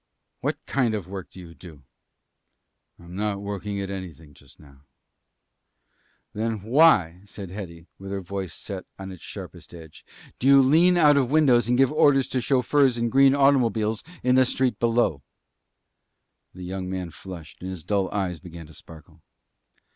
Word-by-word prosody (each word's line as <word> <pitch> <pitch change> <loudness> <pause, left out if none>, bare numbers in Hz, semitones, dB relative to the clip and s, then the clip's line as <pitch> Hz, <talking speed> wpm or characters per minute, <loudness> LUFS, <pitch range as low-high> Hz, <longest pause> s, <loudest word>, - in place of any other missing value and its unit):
"What - - -2
kind 120 -5 0
of 100 -5 -5
work 95 -1 -8
do - - -14
you 85 -2 -11
do?" 75 -2 -14 1.1
"I - - -18
am 85 +1 -11
not 105 0 -2
working 100 0 -5
at 100 0 -4
anything 85 -6 -9
just 70 -1 -19
now." 70 -2 -19 1.5
"Then 110 -1 -3
why," 110 - +4
said 100 -3 -9
Hetty, 85 -4 -9
with 95 0 -9
her 100 0 -3
voice 95 0 -5
set 95 -3 -8
on 95 0 -8
its 90 - -12
sharpest - - -10
edge, 80 -2 -13 0.4
"do 130 - 0
you 140 0 +7
lean 170 +7 +4
out 150 -4 +5
of 130 -3 +1
windows 130 -6 +3
and 125 - +2
give 135 0 +3
orders 140 -3 +3
to 130 - -1
chauffeurs 130 0 +2
in 115 0 -1
green 135 +2 +5
automobiles 115 -6 +2 0.2
in 125 - +3
the 130 0 +5
street 130 -1 0
below?" 115 - +1 1.3
The 90 - -9
young 95 0 -5
man 90 -2 -5
flushed, 85 -2 -11
and 90 - -6
his 90 -4 -7
dull 100 0 -1
eyes 95 -5 -2
began 85 -2 -11
to 80 - -16
sparkle. 80 -1 -15
100 Hz, 170 wpm, -24 LUFS, 90-125 Hz, 1.5 s, you